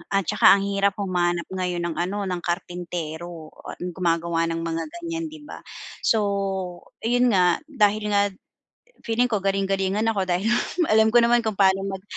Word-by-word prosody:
At 195 - +4
saka - - +6
ang 195 - -1
hirap 200 0 +1
humanap 175 -3 0
ngayon 180 -2 -2
ng - - -6
ano, 200 +4 -2
ng 185 -2 -2
karpintero 170 -2 -5 0.2
at - - -15
gumagawa 170 -1 0
ng 165 0 -3
mga 165 0 -2 0.2
ganyan 335 -1 -4
di 310 -1 -11
ba? - - -10 0.5
So 225 - +4 0.8
yun 245 +1 +3
nga, 180 -2 +4
dahil 215 -7 +2
nga 200 - +4 0.8
feeling 230 +2 +2
ko 210 -4 0
galing-galingan 195 +1 0
ako 195 -3 0
dahil 180 +4 0 0.4
alam 220 +1 +5
ko 235 - +4
naman 240 +1 +4
kung 220 -3 -3
paano 195 -1 +4
mag 190 -1 -6
195 Hz, 165 wpm, -24 LUFS, 175-215 Hz, 0.8 s, saka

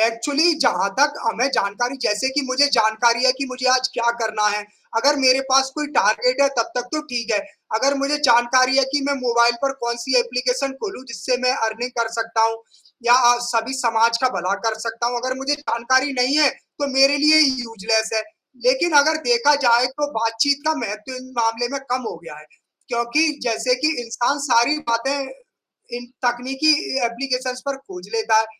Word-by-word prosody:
Actually 280 +9 +2
जहाँ 195 -7 +2
तक 295 +1 +4
हमें 230 +3 0
जानकारी 240 +6 -2
जैसे 210 +5 0
कि 290 - +1
मुझे 260 +2 +3
जानकारी 230 +2 +2
है, 260 - +5
कि 275 +2 -5
मुझे 255 0 -4
आज 255 0 +3
क्या 235 0 +1
करना 215 -1 0
है, 210 0 -2 0.3
अगर 285 +6 +3
मेरे 260 -1 +4
पास 265 0 +4
कोई 300 -1 -3
टारगेट - - +2
है 280 - +4
तब 230 - 0
तक 245 - 0
तो 310 - -1
ठीक 235 -2 -3
है। 210 - +2 0.4
अगर 275 +4 +1
मुझे 275 +2 0
जानकारी 255 +2 +4
है 275 - +4
कि 290 - +1
मैं 285 - 0
मोबाइल 235 -1 +2
पर 275 0 0
कौन-सी 235 +2 0
एप्लीकेशन 250 +3 -2
खोलूँ, 390 - -6
जिससे 235 +3 -2
मैं 255 - +3 0.2
अर्निंग 240 +3 -5
कर 230 -1 0
सकता 225 -1 -1
हूँ 225 0 +1 0.5
या 240 - +6
अ, 245 -1 +5
सभी 240 +1 -2
समाज 230 -2 +1
का 255 - +4
भला 185 +3 -1
कर 220 - -2
सकता 230 +1 -3
हूँ, 245 0 -2
अगर 255 +1 -3
मुझे 275 +2 -1
जानकारी 260 +2 0
नहीं 270 +4 +2
है, 295 - +5
तो 285 - -8
मेरे 275 +1 +5
लिए 300 +2 +4
ये 290 -3 +6
यूज़लेस 220 0 -1
है। 220 - 0 0.4
लेकिन 265 +7 +2
अगर 310 +2 +2
देखा 470 -11 +4
जाए 240 +1 +4
तो 290 -1 -1
बातचीत 230 +5 0
का 315 - +2
महत्व 215 +5 -7
इन 255 0 -12
मामले 230 +1 0
में 275 - -3
कम 255 +1 -1
हो - - -8
गया 160 - -10
है, 150 - -15 0.4
क्योंकि 290 +6 0
जैसे 240 +1 0
कि 310 - +5
इंसान 240 +4 -2
सारी 240 +5 +3
बातें 270 +5 0 0.8
इन 245 0 -9 0.2
तकनीकी 265 +5 +1 0.3
ए - - +2
एप्लीकेशंस 255 +1 -4
पर 275 - -2
खोज 360 +6 -12
लेता 425 - +2
है, 220 - -2
250 Hz, 195 wpm, -20 LUFS, 230-275 Hz, 0.8 s, या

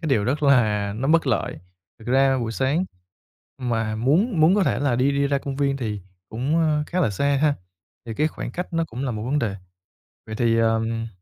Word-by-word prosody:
cái 165 - -3
điều 115 -7 +2
rất 140 +7 -1
là 110 -8 +3
nó 130 +4 -2
bất 165 +1 +3
lợi. - - -1 0.4
Thực 110 - -14
ra 135 +1 +3
buổi 115 -2 -3
sáng 135 +9 0 0.7
mà 115 -4 -1
muốn 160 - +2
muốn 160 +4 +6
có 205 -2 +3
thể 140 - +1
là 140 -4 +1
đi 130 +3 +2
đi 140 0 +1
ra 140 0 +1
công 140 -1 -5
viên 140 -1 +1
thì 110 -6 -4 0.3
cũng, 130 +8 -1
ơ, 155 -2 +2
khá 180 - -1
là 140 - +2
xa 140 +7 +1
ha? 150 -2 +3 0.5
Thì 115 - -5
cái 150 +6 +1
khoảng - - -6
cách 180 +1 -6
nó 165 0 +1
cũng 130 -3 -6
là 130 - -1
một 110 -2 -4
vấn 135 +6 0
đề. 110 -8 -2 0.7
Vậy 110 - -5
thì, 115 0 +2
ờm 115 0 0
135 Hz, 225 wpm, -23 LUFS, 115-150 Hz, 0.7 s, muốn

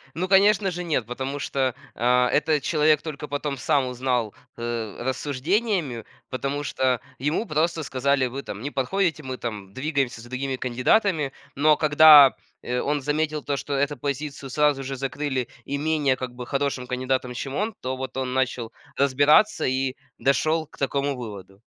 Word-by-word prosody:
Ну 185 +3 -2
конечно 195 0 +4
же, 175 0 -4
нет! 140 -9 -1
Потому 135 +3 -4
что, 130 -3 -1 0.2
а, 125 +1 +3
этот 150 0 +2
человек 155 -2 +3
только 150 -2 -6
потом 145 -1 -3
сам 135 +1 +1
узнал, 125 -3 -1 0.2
э, 115 -3 -4
рассуждениями, 145 - -1 0.3
потому 140 +3 -3
что 130 -4 0 0.2
ему 150 - -1
просто 160 +2 0
сказали: 135 0 +1
"Вы, 130 +3 -5
там, 100 - -7
не 140 +5 -4
подходите, 160 +4 0
мы, 130 -2 -5
там, 105 -6 -6
двигаемся 135 -2 -1
с 115 - -12
другими 130 +2 -3
кандидатами". 140 - +1 0.2
Но 150 +2 +4
когда, 150 -2 +8 0.3
э, 125 0 -2
он 145 +1 0
заметил, 150 +1 -1
то 140 -1 -2
что 140 +1 -4
эту 140 +1 0
позицию 140 +1 -4
сразу 150 0 +2
же 135 0 -4
закрыли 135 -1 -2 0.2
и 140 - -3
менее, 150 -3 +1
как 130 -1 -6
бы, 125 -1 -7
хорошим 140 -2 -1
кандидатом, 125 0 -2
чем 135 +2 -5
он. 210 +6 -1
То 130 +1 -3
вот 130 0 -6
он 130 -1 -2
начал 125 -3 -1 0.2
разбираться 145 +9 +4
и 130 0 0 0.2
дошел 155 +4 +1
к - - -19
такому 140 0 -1
выводу. 100 -5 -9
140 Hz, 165 wpm, -24 LUFS, 125-150 Hz, 0.3 s, когда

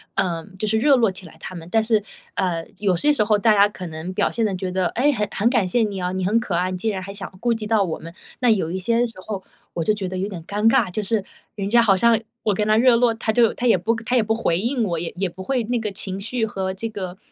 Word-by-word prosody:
呃， 170 -4 -1
就 215 - -1
是 220 +1 +2
热 280 +4 +5
络 230 -5 +3
起 185 0 -10
来 165 - -13
他 - - -8
们， 165 -1 -8
但 225 -1 +3
是， 220 -2 +2 0.3
呃， 170 -3 -1
有 200 -3 +1
些 295 - +3
时 225 - +2
候 210 0 +3
大 220 +2 +3
家 200 0 +6
可 185 -3 -8
能 160 +3 -6
表 200 +2 +1
现 230 - 0
得 200 -3 -1
觉 185 0 -3
得： 185 -1 +1
“诶， 280 +5 +3
很 210 -6 -1
很 220 +4 +2
感 220 -7 +2
谢 230 +6 +1
你 200 -3 -3
啊， 180 0 -1
你 185 -1 -2
很 215 +5 +3
可 205 -7 -3
爱， 180 +2 0
你 185 - -3
竟 220 +4 -1
然 190 -2 -4
还 195 - -7
想 200 0 -7
顾 240 -1 +2
及 220 -2 -4
到 215 -2 +3
我 165 -4 -3
们。 165 +1 -10 0.3
“那 250 -2 +3
有 190 -7 +2
一 190 - -2
些 230 +5 +2
时 230 - -6
候 200 -3 -4 0.3
我 165 - -2
就 215 - +2
觉 200 -3 -3
得 185 - -4
有 190 +2 -1
点 175 -5 -7
尴 210 +3 0
尬， 235 -4 +3
就 210 +3 -2
是 210 0 0 0.3
人 200 -1 -3
家 235 +2 +5
好 205 -4 +4
像 230 +2 +4 0.2
我 210 - +2
跟 210 - 0
他 215 0 +4
热 250 0 +6
络， 235 0 +3
他 220 -1 -1
就 230 -2 +4
他 250 - -1
也 225 - +5
不 220 +7 0
他 255 - 0
也 235 - +4
不 220 +1 0
回 175 -6 0
应 240 +2 0
我， 175 -5 -1
也 170 - -4
也 190 0 0
不 190 +2 -9
会 255 +2 0
那 245 +1 0
个 215 -2 -3
情 195 0 -3
绪 230 +2 -1
和 190 -3 -3
这 210 +4 -4
个 190 -4 -6
205 Hz, 320 characters per minute, -22 LUFS, 185-230 Hz, 0.3 s, 家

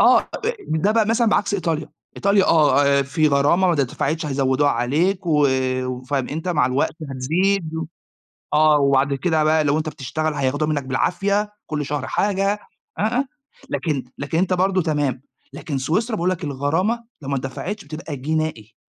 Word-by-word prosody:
أ - - +7
أ - - -3 0.4
ده 160 +6 +1
بقى 225 -2 +3
مثلًا 230 +2 +2
بعكس 205 -1 +1
إيطاليا 165 -5 -2 0.3
إيطاليا، 200 0 +3
آه، 150 -2 +4
آآ 140 0 +3
في 155 +3 +1
غرامة، 145 +7 +3
ما 180 - +3
اتدفعتش 150 +2 -1
هيزودوها 135 0 +2
عليك، 160 +11 0
و 150 -3 +4 0.4
وفأنت 135 +6 -3
مع 155 -7 +2
الوقت 130 +4 0 0.2
هتزيد 165 +6 0
و 160 0 -3 0.7
آه، 150 0 +5
وبعد 140 0 +3
كده 160 +2 +1
بقى 155 0 +3
لو 145 +1 +2
انت 155 0 -2
بتشتغل، 155 +2 -3
هياخدوها 145 +2 0
منك 145 -2 -1
بالعافية، 200 +10 0
كل 150 -2 -3
شهر 145 -2 -3
حاجة، 200 0 0 0.4
آه، - - 0
آه، 245 +6 +1 0.4
لكن 150 -6 -1
لكن 145 +3 -3
أنت 185 +2 +2
برضو 185 +1 +2
تمام، 145 -6 -1 0.3
لكن 145 0 -4
سويسرا، 215 - 0
باقول 180 -2 0
لك 180 -2 -3
الغرامة 160 - 0 0.2
لو 140 - -7
ما 140 - 0
اتدفعتش، 135 +10 -5
بتبقى 155 0 -6
جنائي. 145 -5 -3
155 Hz, 165 wpm, -21 LUFS, 140-185 Hz, 0.7 s, أ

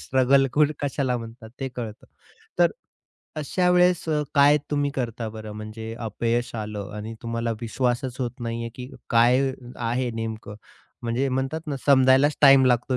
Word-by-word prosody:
Struggle 135 +1 +3
खुठ 150 0 +3
कशाला 135 -3 -1
म्हणतात 115 -1 -9
ते 135 - -2
कळतं. 115 -4 -8 0.5
तर - - +5 0.7
अशा 180 +4 0
वेळेस 180 -1 +3
अ, 150 -1 +1
काय 145 +1 +6
तुम्ही 145 -1 0
करता 115 -3 -3
बरं, 110 -1 -8
म्हणजे 110 +1 -7
अपयश 115 +2 -2
आलं 105 -3 -5
आणि 110 +2 -6
तुम्हाला 115 0 -2
विश्वासच 125 +2 -1
होत 125 0 -4
नाहीये 115 0 -3
की 125 +1 -8 0.2
काय 125 +3 +4 0.2
आहे 120 +1 -1
नेमकं 110 -2 -5 0.5
म्हणजे 120 +4 0
म्हणतात 135 +4 -2
ना, 145 -2 -3
समजायलाच 135 +1 +5
टाईम 135 -2 +7
लागतो 125 +1 +2
125 Hz, 150 wpm, -24 LUFS, 115-135 Hz, 0.7 s, टाईम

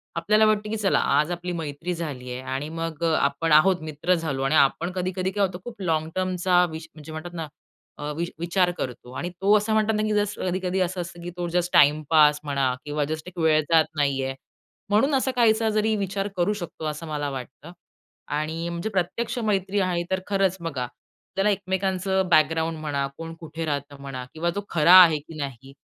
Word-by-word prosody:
आपल्याला 215 +6 +3
वाटतं, 215 0 +1
की 220 - -2
चला 205 -2 +2
आज 150 +4 +2
आपली 175 +1 -4
मैत्री 165 +1 -4
झाली 140 -7 -5
आहे 125 - -5
आणि 145 +3 -3
मग 165 0 -5
अ, 165 - +2
आपण 140 +4 0
आहोत 170 +3 +5
मित्र 155 +3 0
झालो. 150 -6 -2
आणि 135 +3 +2
आपण 165 +5 +3
कधी-कधी 185 +1 -2
काय 200 0 +2
होतं 180 -1 -6
खूप 235 -5 -9
लाँग 160 -3 0
टर्मचा 185 -1 +2
वि 160 - -5 0.2
म्हणजे 155 0 -11
म्हणतात 165 +3 -7
ना 165 -2 -4 0.5
अ, 145 0 -4
वि 170 - 0
विचार 175 +2 +2
करतो 125 -1 -6
आणि 175 - -3
तो 200 +2 +5
असं 210 +1 -1
म्हणतात 220 0 +2
ना, 215 - 0
की 215 - 0
जस्ट 205 0 0
कधी-कधी 185 0 -1
असं 180 0 -1
असतं, 175 0 -8
की 175 - -5
तो 175 0 -2
जस्ट 175 +1 0
टाईमपास 150 0 +5
म्हणा 140 -3 0
किंवा 150 0 -1
जस्ट 155 +2 -5
एक 180 0 -11
वेळ 160 -1 +4
जात 160 -1 +6
नाहीये. 135 -2 0 0.6
म्हणून 220 +8 +3
असा 265 0 +1
काहीसा 225 -2 +3
जरी 215 +1 +1
विचार 195 0 -2
करू 180 +4 +2
शकतो. 175 -5 -7
असं 155 +2 -4
मला 145 -2 -2
वाटतं. 135 +4 -8 0.6
आणि 160 +3 -2
म्हणजे 170 +5 -3
प्रत्यक्ष 220 +5 -2
मैत्री 200 -3 0
आहे 180 -2 0
तर 190 - +1
खरंच 195 -2 +1
बघा. 145 -7 -3
आपल्याला 195 +10 -4
एकमेकांचं 190 -1 0
बॅकग्राऊंड 160 0 +3
म्हणा, 145 -3 -1
कोण 165 0 -7
कुठे 165 0 -6
राहतं 145 -1 -4
म्हणा 135 -2 -6
किंवा 165 +2 -1
तो 205 - -1
खरा 170 +2 +5
आहे, 165 -4 +6
की 155 +2 -13
नाही 135 -2 -6
170 Hz, 195 wpm, -25 LUFS, 150-190 Hz, 0.6 s, जात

